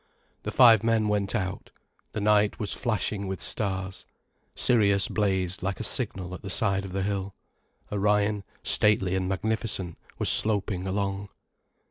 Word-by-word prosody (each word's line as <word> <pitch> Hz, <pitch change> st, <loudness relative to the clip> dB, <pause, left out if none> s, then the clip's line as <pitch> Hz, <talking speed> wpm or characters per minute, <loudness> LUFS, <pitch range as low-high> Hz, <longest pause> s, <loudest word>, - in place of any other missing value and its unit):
The -, -, -4 dB
five 115 Hz, -4 st, +7 dB
men 115 Hz, -2 st, +2 dB
went 105 Hz, +1 st, 0 dB
out. 95 Hz, -3 st, -3 dB, 0.4 s
The 110 Hz, -, -3 dB
night 105 Hz, 0 st, +3 dB
was 105 Hz, -, -3 dB
flashing 105 Hz, -4 st, -2 dB
with 95 Hz, 0 st, -4 dB
stars. 95 Hz, -2 st, -3 dB, 0.5 s
Sirius 100 Hz, -5 st, +3 dB
blazed 95 Hz, -3 st, -1 dB
like 95 Hz, 0 st, -3 dB
a -, -, -3 dB
signal 90 Hz, -1 st, -3 dB
at 90 Hz, -, -8 dB
the 100 Hz, -, -7 dB
side 100 Hz, 0 st, 0 dB
of 95 Hz, -, -8 dB
the 95 Hz, +1 st, -2 dB
hill, 100 Hz, -1 st, -3 dB, 0.6 s
Orion, 105 Hz, 0 st, +1 dB, 0.2 s
stately 100 Hz, -3 st, +2 dB
and 95 Hz, 0 st, -1 dB
magnificent, 100 Hz, -3 st, -2 dB, 0.2 s
was -, -, 0 dB
sloping 100 Hz, -3 st, +2 dB
along. 100 Hz, +1 st, -2 dB
100 Hz, 145 wpm, -27 LUFS, 95-105 Hz, 0.6 s, five